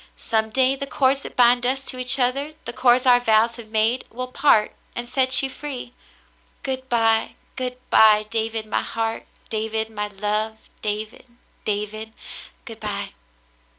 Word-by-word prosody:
Some 220 -1 -1
day 260 +3 +2
the 275 +1 -6
cords 270 0 +1
that - - -10
bind 245 0 +5
us 265 +2 -1
to 255 - -5
each 250 +1 +3
other, 275 +4 0
the - - -5
cords 250 +1 +3
our 245 -1 +6
vows 230 0 +2
have 235 -2 -10
made, 220 +3 +1
will 255 +2 -6
part 255 -6 +3 0.2
and 240 0 -4
set 260 +1 +5
you 270 - -1
free. 260 -4 -6 0.7
Good 260 -1 -4
by, 225 -2 +2 0.2
good 250 -1 -4
by, 215 -1 +6
David 225 -1 -2
my 215 - -1
heart, 225 0 -3 0.2
David 220 0 -2
my 210 -1 -3
love, 210 +2 -2 0.2
David, 215 +3 -4 0.4
David, 215 +1 -3 0.5
good - - -9
by. - - -4
235 Hz, 155 wpm, -22 LUFS, 220-255 Hz, 0.7 s, our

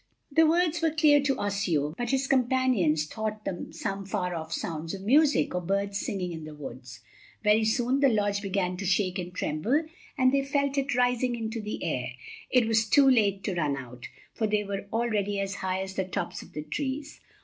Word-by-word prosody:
The 320 +2 +5
words 340 0 +2
were 325 - +3
clear 305 -2 +4
to 275 -2 0
Osseo, 175 -8 0
but 240 -1 -3
his 270 +1 +1
companions 250 - +2
thought 215 +4 -4
them 175 - -4
some 195 0 -4
far 190 -2 -2
off 160 -1 -5
sounds 165 +2 -3
of 190 - -9
music, 290 +7 +4
or 180 - -1
birds 200 +2 -1
singing 185 -4 -3
in 160 -2 -6
the 155 0 -9
woods. 130 -3 -9 0.4
Very 210 +1 +4
soon 245 +4 +1
the 275 -1 +5
lodge 205 -3 +1
began 190 -2 -1
to 195 - -4
shake 185 0 +1
and 180 0 -5
tremble, 185 - 0 0.3
and 255 -1 +4
they 275 0 +3
felt 280 0 0
it 275 -2 -1
rising 245 0 +2
into 225 0 -4
the 210 0 -5
air. 125 -7 -2 0.4
It 250 -3 +3
was 220 -1 +2
too 280 +2 +6
late 205 -7 +3
to 195 - -1
run 150 -5 0
out, 125 -2 -9 0.3
for 220 - 0
they 210 0 +1
were 200 0 -5
already 210 -3 0
as 195 0 -2
high 190 0 -1
as 190 0 -7
the 190 - -1
tops 185 -1 -4
of - - -15
the 150 - -5
trees. 280 - -4
205 Hz, 205 wpm, -28 LUFS, 180-255 Hz, 0.4 s, too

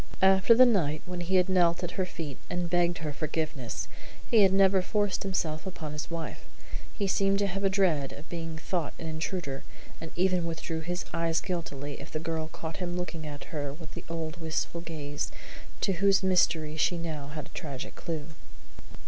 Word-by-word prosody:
After 190 +4 +7
the 255 +2 +9
night 160 -11 +2
when 180 -1 -4
he 180 +2 0
had 180 0 +5
knelt 175 -2 +4
at 175 - -2
her 185 0 -1
feet 150 -7 -5
and 175 -1 -1
begged 175 -1 +3
her 150 -1 -3
forgiveness 155 -5 -2 0.4
he 225 - +7
had 195 -2 +7
never 195 0 +5
forced 205 0 +1
himself 175 -4 -1
upon 155 -5 -5
his 150 - -4
wife. 170 -1 -4 0.5
He 205 - +1
seemed 195 0 +3
to 200 - +2
have 195 +1 -2
a 195 - +5
dread 175 -8 +2
of 145 - -10
being 165 -2 -4
thought 165 -1 -2
an - - -6
intruder, 160 -3 -3 0.4
and 165 - -5
even 180 -1 +2
withdrew 165 0 -3
his 175 +3 -3
eyes 165 -1 +2
guiltily 145 -6 -4
if 145 - -9
the 155 - -3
girl 160 0 -2
caught 160 0 -6
him 180 -1 -2
looking 165 -3 -4
at 145 -1 -6
her 145 -2 -2
with 160 0 -9
the - - -7
old 165 0 -3
wistful 160 +1 -1
gaze 145 -4 -4 0.5
to 195 - +3
whose 195 +2 +4
mystery 165 -4 +3
she 175 - +3
had 170 0 -3
now 150 -3 -4
a 150 - -3
tragic 140 -6 -6
clue. 160 -2 -4
170 Hz, 190 wpm, -30 LUFS, 155-185 Hz, 0.5 s, the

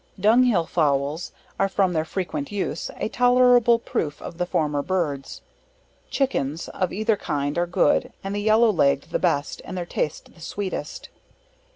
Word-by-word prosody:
Dunghill 220 -3 +4
Fowls, 150 0 0 0.3
are 195 - +2
from 190 -2 +1
their 160 -1 0
frequent 160 -5 -4
use, 190 -5 -3
a - - -2
tolerable 245 0 +5
proof 150 -9 -3
of 170 - -9
the 180 - 0
former 150 -4 0
birds. 150 -6 -3 0.7
Chickens, 165 - -1
of 185 - -2
either 215 +2 +1
kind 145 -6 -2
are 175 0 0
good, 175 - +2
and 195 +1 -4
the 205 - -1
yellow 220 +2 +4
leg'd 140 -6 +1
the - - 0
best, 140 0 0
and 185 - -7
their 175 - -3
taste 150 -3 -4
the 170 - -18
sweetest. 200 - -5
180 Hz, 160 wpm, -24 LUFS, 150-215 Hz, 0.7 s, tolerable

